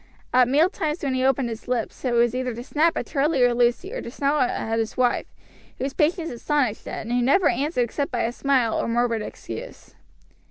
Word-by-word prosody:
At 250 -1 +5
mealtimes 310 +3 +1
when 275 -2 0
he 255 0 0
opened 265 -2 +2
his 225 -1 -7
lips 245 -3 -3
it 250 -2 0
was 235 0 +3
either 255 -2 -2
to 240 - -6
snap 315 +5 +1
at - - -2
Charlie 285 -2 +1
or 245 0 +4
Lucy, 245 - +1
or - - -4
to - - -7
snarl 280 +3 0
at 225 -2 0
his 225 -1 -3
wife, 250 -1 +1 0.5
whose 270 +2 -3
patience 330 +1 0
astonished 250 -2 -1
Ned, - - -5
and 235 - -3
who 245 - +2
never 280 +10 +4
answered 270 +1 0
except 280 +4 -2
by 240 - 0
a 230 - 0
smile 250 -3 +1
or - - -1
murmured 230 -1 +1
excuse. 115 - -8
255 Hz, 210 wpm, -24 LUFS, 235-290 Hz, 0.5 s, At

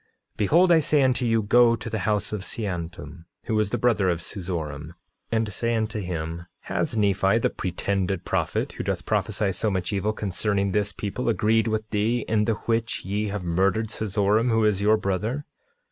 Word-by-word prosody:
9:26 - - -43
Behold 170 - +4
I 165 - +7
say 150 -1 +2
unto 130 -1 +2
you: 115 -1 +2
Go 115 +3 +5
to 110 0 -8
the 110 -1 -2
house 105 +1 -1
of 105 - -2
Seantum, 85 -6 -5 0.2
who 110 -1 0
is 105 -2 +1
the 120 - -1
brother 110 -5 +2
of 85 -2 0
Seezoram, 85 -4 -5 0.4
and 110 -2 0
say 115 +5 0
unto 110 -1 -1
him— 85 -3 -4
9:27 85 - -13
Has - - -2
Nephi, 100 0 +3
the 115 - +1
pretended 95 0 -2
prophet, - - -1
who - - -6
doth 95 -2 -2
prophesy 105 0 0
so 110 +3 0
much 95 0 -2
evil 100 +2 0
concerning 100 -1 -1
this 105 0 +1
people, 105 +5 -3
agreed 110 0 +2
with 110 0 -1
thee, 110 +3 +1
in 110 -1 +2
the 115 - +2
which 115 -1 -1
ye 105 +3 -1
have 100 -2 -4
murdered 95 +5 +1
Seezoram, 105 +2 +1
who 115 -1 +3
is 105 -2 +2
your 105 +2 +4
brother? 105 +8 -2
105 Hz, 190 wpm, -25 LUFS, 95-110 Hz, 0.4 s, I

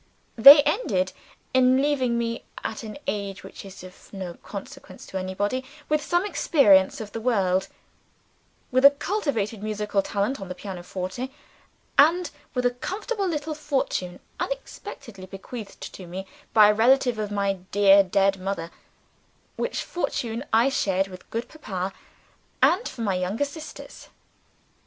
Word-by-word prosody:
They 280 +5 +10
ended 185 - 0 0.4
in 260 0 +5
leaving 265 -4 +1
me 230 0 -2 0.2
(at 220 - -4
an 220 0 -8
age 200 -1 -3
which - - -10
is 195 -2 -11
of 185 0 -14
no 185 -3 -6
consequence 200 +3 -10
to 190 - -5
anybody) 205 +7 -2 0.3
with 305 0 +2
some 350 +5 +1
experience 205 - +4
of 215 -2 -7
the 225 - -5
world; 190 -6 +1 1.0
with 255 +1 +2
a 280 - +11
cultivated 280 - -2
musical 210 -1 -1
talent 205 +6 -2
on 190 - -7
the 180 - -5
pianoforte; 185 +5 -5 0.7
and 330 +2 +5 0.2
with 250 0 0
a 245 - +4
comfortable 395 - -3
little 310 -2 -2
fortune 270 - -2 0.2
unexpectedly 230 - -6
bequeathed 200 +2 -9
to 185 - -10
me 185 +3 -6 0.3
by 215 -2 +7
a - - +5
relative 245 +1 +3
of 210 -1 -2
my 200 -2 -1
dear 200 0 +6
dead 195 0 +2
mother 185 -3 -4 0.8
(which 485 - -2
fortune 240 -8 -3
I 230 +4 +4
shared 195 -7 0
with 185 -1 -12
good 230 +2 -3
Papa 195 -11 -5 0.7
and 365 - +5
with - - -8
my 220 -5 0
younger 185 +9 -1
sisters). 310 +2 -10
215 Hz, 140 wpm, -25 LUFS, 195-270 Hz, 1.0 s, a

